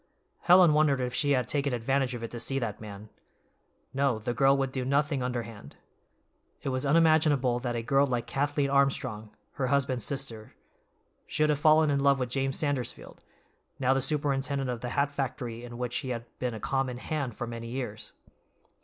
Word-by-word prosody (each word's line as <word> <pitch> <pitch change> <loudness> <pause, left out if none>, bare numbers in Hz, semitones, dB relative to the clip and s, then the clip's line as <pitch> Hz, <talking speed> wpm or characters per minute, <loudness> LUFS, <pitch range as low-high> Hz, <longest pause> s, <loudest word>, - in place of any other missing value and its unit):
Helen 180 -3 +6
wondered 150 -3 +3
if 125 -1 -2
she 145 +2 +2
had 125 -3 +1
taken 140 -3 0
advantage 130 +2 0
of 115 - -7
it 115 - -5
to 120 - -6
see 135 +4 0
that 115 -6 -3
man. 105 0 -9 0.8
No, 135 -3 +1
the 110 +3 -3
girl 135 +2 +4
would 135 -1 -1
do 130 -1 -2
nothing 140 +1 +1
underhand. 115 - -5 0.9
It - - -2
was 130 +1 -1
unimaginable 150 -5 +3
that 120 -1 -3
a 115 - -2
girl 135 +3 +3
like 120 -2 -1
Kathleen 145 0 -1
Armstrong, 135 -6 +1 0.2
her 130 -2 -2
husband's 130 -3 +1
sister, 130 -6 -3 0.7
should 150 0 +1
have 145 - -1
fallen 155 0 +5
in 140 - +1
love 140 0 +4
with 125 -2 -2
James 135 0 -1
Sandersfield, 145 -5 -3 0.6
now 130 -1 +2
the 135 - +1
superintendent 140 -1 -1
of 120 -2 -5
the 125 - -4
hat 140 +2 0
factory 125 -4 -4
in 120 -1 -8
which 125 0 -2
he 130 - -4
had 120 -2 -4
been 125 -2 -2
a - - -6
common 135 +1 -1
"hand" 135 -3 -3
for 120 - -4
many 115 0 -7
years. 115 -3 -5
135 Hz, 185 wpm, -28 LUFS, 120-140 Hz, 0.9 s, Helen